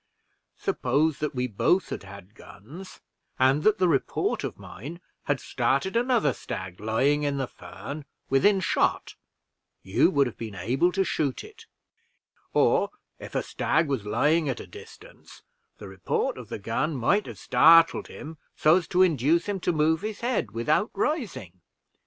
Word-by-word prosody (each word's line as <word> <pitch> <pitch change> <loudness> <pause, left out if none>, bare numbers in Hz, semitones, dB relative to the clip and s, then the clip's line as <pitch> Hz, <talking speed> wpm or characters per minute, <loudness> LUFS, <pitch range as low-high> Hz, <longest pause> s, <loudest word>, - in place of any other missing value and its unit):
Suppose 145 +4 0
that 150 -1 -3
we 125 0 0
both 140 - +1
had 100 0 -12
guns, 150 - -13 0.4
and 130 +3 +3
that 215 +5 +3
the 185 - +2
report 145 -5 0
of - - -5
mine 145 - -9 0.3
had 145 -2 0
started 135 - -1
another 235 - +2
stag 95 -4 -7
lying 130 +7 +1
in 145 -1 -1
the 135 - -1
fern 140 +3 -9 0.2
within 190 +9 +3
shot, - - 0 0.7
you - - +3
would 140 -1 +3
have 125 - -7
been 110 -3 -6
able 125 - +1
to 195 +1 +1
shoot 145 -7 -2
it; - - -15 0.8
or - - +3 0.3
if - - -10
a - - 0
stag 155 +1 0
was 135 -7 -2
lying 145 +9 +1
at 130 - -3
a - - -8
distance, 455 +3 -14 0.3
the - - -10
report 475 +2 -2
of - - -10
the - - -4
gun 155 0 -2
might 185 - +1
have - - -8
started 165 +1 +5
him 155 0 -10 0.2
so 155 +3 +5
as 180 - -3
to 185 +1 +4
induce 165 0 +2
him 205 -2 -2
to 180 - 0
move 160 +1 +1
his 215 0 -5
head 245 +1 -1
without 150 - 0
rising. 195 - -3
150 Hz, 160 wpm, -26 LUFS, 130-185 Hz, 0.8 s, started